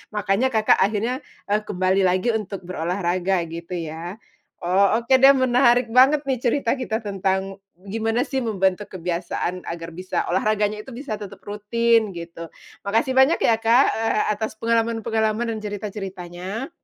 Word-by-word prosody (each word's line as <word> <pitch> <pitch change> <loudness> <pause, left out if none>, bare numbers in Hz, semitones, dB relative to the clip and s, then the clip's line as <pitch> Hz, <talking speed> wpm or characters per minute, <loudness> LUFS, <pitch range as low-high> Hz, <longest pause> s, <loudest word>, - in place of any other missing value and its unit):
makanya 205 +4 +1
Kakak 220 -4 +3
akhirnya, 220 +6 0 0.3
eee, 210 - +3
kembali 185 0 +1
lagi 185 +5 +1
untuk 210 -4 -4
berolahraga 180 +1 -1
gitu 170 +2 -6
ya. 165 +2 -5 0.4
Oh, 195 +5 +3
oke 240 +3 +3
deh 270 +1 +8
menarik 250 -2 +3
banget 260 +6 +5
nih 265 - +1
cerita 245 0 +1
kita 245 -4 -3
tentang 195 -2 -2 0.3
gimana 225 +5 -1
sih 265 -2 -2
membentuk 195 -2 0
kebiasaan 180 0 -3
agar 170 0 -7
bisa 185 +1 -3
olahraganya 210 +2 0
itu 265 - -11
bisa 250 -2 -5
tetap 205 -2 -9
rutin 220 +1 +1
gitu. 170 -1 -8 0.3
Makasih 225 +6 0
banyak 265 +5 +5
ya, 230 - +3
Kak, 230 +4 +4
eee, 225 -1 0
atas 220 +1 -5
pengalaman-pengalaman 225 0 0
dan - - -5
cerita-ceritanya. 195 - -6
210 Hz, 145 wpm, -22 LUFS, 185-230 Hz, 0.4 s, deh